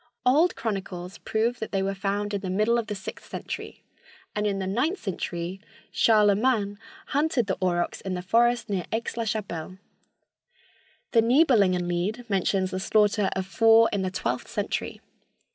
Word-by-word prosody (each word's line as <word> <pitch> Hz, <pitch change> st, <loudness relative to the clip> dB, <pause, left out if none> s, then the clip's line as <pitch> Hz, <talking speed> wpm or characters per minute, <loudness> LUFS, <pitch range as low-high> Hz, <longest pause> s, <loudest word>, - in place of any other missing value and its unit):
Old 300 Hz, +8 st, +4 dB
chronicles 190 Hz, -4 st, -4 dB
prove 230 Hz, +2 st, -1 dB
that 220 Hz, -, -5 dB
they 195 Hz, -1 st, 0 dB
were 195 Hz, 0 st, -1 dB
found 200 Hz, +1 st, -2 dB
in 200 Hz, -, -1 dB
the 190 Hz, -, -4 dB
middle 215 Hz, +5 st, +2 dB
of 230 Hz, -, -4 dB
the 210 Hz, -, -3 dB
sixth 195 Hz, 0 st, -8 dB
century, -, -, -6 dB, 0.5 s
and 210 Hz, 0 st, 0 dB
in 200 Hz, -1 st, -1 dB
the 190 Hz, -, -2 dB
ninth 250 Hz, -, 0 dB
century 180 Hz, -1 st, -4 dB, 0.3 s
Charlemagne 210 Hz, -1 st, +3 dB, 0.3 s
hunted 285 Hz, -4 st, +1 dB
the 190 Hz, -, -1 dB
aurochs 175 Hz, -2 st, 0 dB
in 190 Hz, -1 st, -3 dB
the 180 Hz, -, -5 dB
forests 235 Hz, +4 st, +2 dB
near 190 Hz, -4 st, -2 dB
Aix 225 Hz, +1 st, -2 dB
la 230 Hz, -1 st, -2 dB
Chapelle. 190 Hz, -6 st, -4 dB, 1.3 s
The 230 Hz, -, +5 dB
Nibelungen 225 Hz, -, +4 dB
Lied 200 Hz, +8 st, -2 dB
mentions 190 Hz, -1 st, +1 dB
the 185 Hz, -, -2 dB
slaughter 210 Hz, 0 st, +2 dB
of 190 Hz, -1 st, -2 dB
four 225 Hz, +3 st, +5 dB
in 200 Hz, -, 0 dB
the 185 Hz, -, -1 dB
twelfth 125 Hz, -9 st, -3 dB
century. -, -, -3 dB
205 Hz, 160 wpm, -26 LUFS, 190-230 Hz, 1.3 s, The